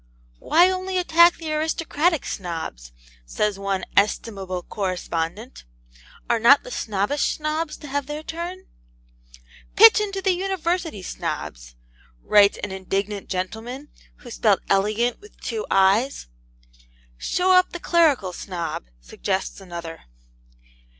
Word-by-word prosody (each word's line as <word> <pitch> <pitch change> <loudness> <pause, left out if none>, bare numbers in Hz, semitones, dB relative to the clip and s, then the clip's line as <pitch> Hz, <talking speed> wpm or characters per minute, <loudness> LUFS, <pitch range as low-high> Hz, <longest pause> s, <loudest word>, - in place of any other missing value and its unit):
'Why 345 +2 +5
only 370 0 -2
attack 340 -1 +5
the 320 -2 -5
aristocratic 320 0 0
Snobs?' 160 - -5 0.3
says 200 - -2
one 195 -2 -2
'estimable 195 -3 0
correspondent: 185 +2 -4 0.6
'are 235 - +2
not 255 +6 +6
the - - -10
snobbish 210 - -1
Snobs 305 0 -3
to 295 - -11
have 280 0 -2
their 300 +1 -5
turn?' 345 +4 -6 1.1
'Pitch 450 +1 +8
into 395 -2 -3
the 385 0 +2
University 355 - -2
Snobs!' - - -5 0.5
writes 205 -1 +5
an 205 - -3
indignant 195 +2 -3
gentleman 225 +9 -5 0.3
(who 240 - -13
spelt 210 -3 +2
ELEGANT 215 +5 +1
with 420 +1 -17
two 440 -1 -4
I's) 200 +8 +2 0.9
'Show 370 +1 +1
up 365 0 +5
the 350 - -6
Clerical 295 - +2
Snob,' 170 - -5
suggests 190 - -3
another. 170 -3 -8
235 Hz, 115 wpm, -23 LUFS, -, 1.1 s, Pitch